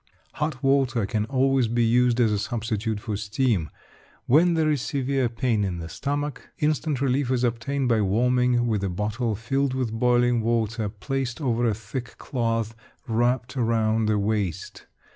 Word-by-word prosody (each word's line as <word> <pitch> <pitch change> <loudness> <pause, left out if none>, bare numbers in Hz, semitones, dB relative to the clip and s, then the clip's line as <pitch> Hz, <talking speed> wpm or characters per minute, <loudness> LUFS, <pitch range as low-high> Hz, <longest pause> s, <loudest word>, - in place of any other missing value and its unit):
Hot 150 -3 -3
water 135 -5 +2
can 105 +1 -1
always 130 0 +2
be 120 +1 +1
used 120 +1 +3
as 115 -3 +4
a 105 - 0
substitute 110 -1 -2
for 105 0 -4
steam. 105 - 0 0.6
When 165 +6 +4
there 155 -1 +2
is 145 -4 0
severe 135 -3 0
pain 115 -2 0
in 95 -3 -2
the 85 -1 -6
stomach, 145 - -4
instant 150 -2 0
relief 135 -1 +1
is 130 -1 +1
obtained 125 +3 -1
by 115 -3 +3
warming 125 +4 +2
with 110 -4 0
a 100 - 0
bottle 105 +5 -2
filled 135 +4 -1
with 125 -4 -2
boiling 120 0 +2
water 110 -1 0
placed 125 +3 -3
over 120 -4 +1
a 110 - +1
thick 115 +4 -7
cloth 115 -3 -2 0.3
wrapped 120 +3 0
round 110 -2 +1
the 105 - +2
waist. 100 -4 -2
120 Hz, 160 wpm, -25 LUFS, 110-130 Hz, 0.6 s, as